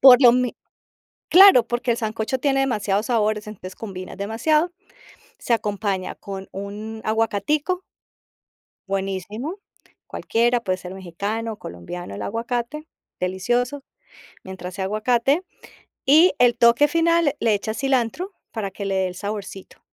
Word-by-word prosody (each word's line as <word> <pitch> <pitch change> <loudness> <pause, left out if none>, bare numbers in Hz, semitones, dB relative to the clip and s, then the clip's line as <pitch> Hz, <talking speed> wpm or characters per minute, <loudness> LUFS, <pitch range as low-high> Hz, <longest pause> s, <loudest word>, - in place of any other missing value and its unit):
por 260 -1 +9
lo 240 -2 +9
mi 250 -1 0 0.7
claro, 365 - +8
porque 240 0 0
el - - -2
sancocho 225 +3 -2
tiene 270 0 +1
demasiados 210 -5 0
sabores, 215 -3 0
entonces 185 -3 -9
combinas 190 -4 -7
demasiado. 300 - +1 0.7
Se 235 - 0
acompaña 200 -3 -1
con 195 -1 -8
un 210 +3 -6
aguacatico 225 - 0 1.1
buenísimo, 195 - -3 0.5
cualquiera, 240 +1 +1
puede 185 -5 -1
ser 180 0 -8
mexicano, 205 +5 -4
colombiano 100 - -8
el - - -6
aguacate, 240 +7 -3 0.3
delicioso, 240 +9 -1 0.6
mientras 185 -1 -7
sea 190 - -3
aguacate. 240 - +1 0.6
Y 315 +6 +6
el 245 -1 +4
toque 235 +5 +5
final, 330 -1 +2
le 225 - +2
echas 215 +2 -2
cilantro 270 - 0 0.2
para 205 -4 -4
que 200 +1 -6
le 195 -1 -1
dé 190 -1 +1
el 180 - -7
saborcito. 200 -1 -6
225 Hz, 130 wpm, -23 LUFS, 195-255 Hz, 1.1 s, por